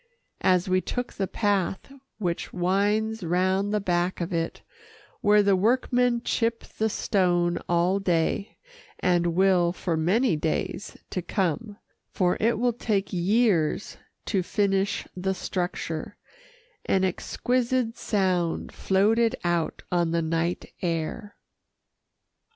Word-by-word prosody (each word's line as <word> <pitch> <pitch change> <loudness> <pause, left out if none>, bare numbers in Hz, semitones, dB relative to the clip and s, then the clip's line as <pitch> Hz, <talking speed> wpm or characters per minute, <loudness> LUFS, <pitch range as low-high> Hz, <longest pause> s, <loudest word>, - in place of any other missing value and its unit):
As 185 0 +3
we 185 0 +2
took 245 +4 -4
the 195 - -2
path 200 +4 -1 0.2
which 175 -5 -3
winds 205 +4 0
round 185 +4 +1
the 210 - +1
back 180 -1 0
of 175 +1 -3
it, 165 0 -2 0.6
where 210 0 +5
the 200 -1 +4
workmen 245 +3 +2
chip 230 0 0
the 220 0 -2
stone 175 -5 +1
all 175 +3 +2
day, 180 +1 0 0.4
and 175 -2 +1
will 185 -2 +4
for 175 -1 -2
many 185 +7 +2
days 160 +5 -3
to 185 - -2
come 195 +3 -2 0.3
(for 180 -3 +1
it 230 +2 +2
will 245 +1 +1
take 205 -4 -1
years 185 -2 +1 0.3
to 195 - +1
finish 195 +1 0
the 190 +1 -1
structure) 175 -4 -4 0.7
an 190 - +2
exquisite 240 +5 0
sound 185 -5 0
floated 225 +5 +2
out 175 -2 -1
on 175 -2 +2
the 165 0 0
night 165 +2 -2
air. 175 +5 -3
190 Hz, 120 wpm, -26 LUFS, 175-210 Hz, 0.7 s, where